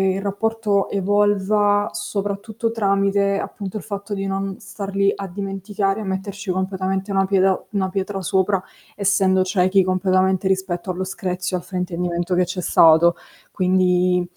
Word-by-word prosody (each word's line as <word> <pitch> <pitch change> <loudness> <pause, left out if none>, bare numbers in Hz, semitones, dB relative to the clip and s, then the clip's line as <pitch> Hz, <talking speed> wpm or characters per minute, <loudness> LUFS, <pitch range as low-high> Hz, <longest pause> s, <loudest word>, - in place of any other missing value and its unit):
il 195 - -3
rapporto 205 0 0
evolva, 205 +1 +2
soprattutto 205 +3 -3
tramite 200 -2 +1
appunto 200 0 -5
il - - -7
fatto 200 -1 -5
di 195 0 -3
non 195 0 -2
star 195 -1 -7
lì 200 0 +3
a 200 - -6
dimenticare, 195 +2 -3
a - - -4
metterci 195 +1 -5
completamente 190 +1 -2
una 195 0 +2
pieda 190 -1 +2
una 195 -2 -1
pietra 195 +1 -3
sopra, 190 +1 +1 0.3
essendo 190 -2 +2
ciechi 185 +1 +2
completamente 185 0 +1
rispetto 190 -1 -1
allo 185 +1 -2
screzio, 185 -1 -3
al 175 - -8
fraintendimento 180 -1 -2
che 180 0 +3
c'è 180 +1 -4
stato. 165 +1 +5 0.4
Quindi 180 -1 +2
195 Hz, 140 wpm, -21 LUFS, 185-200 Hz, 0.4 s, stato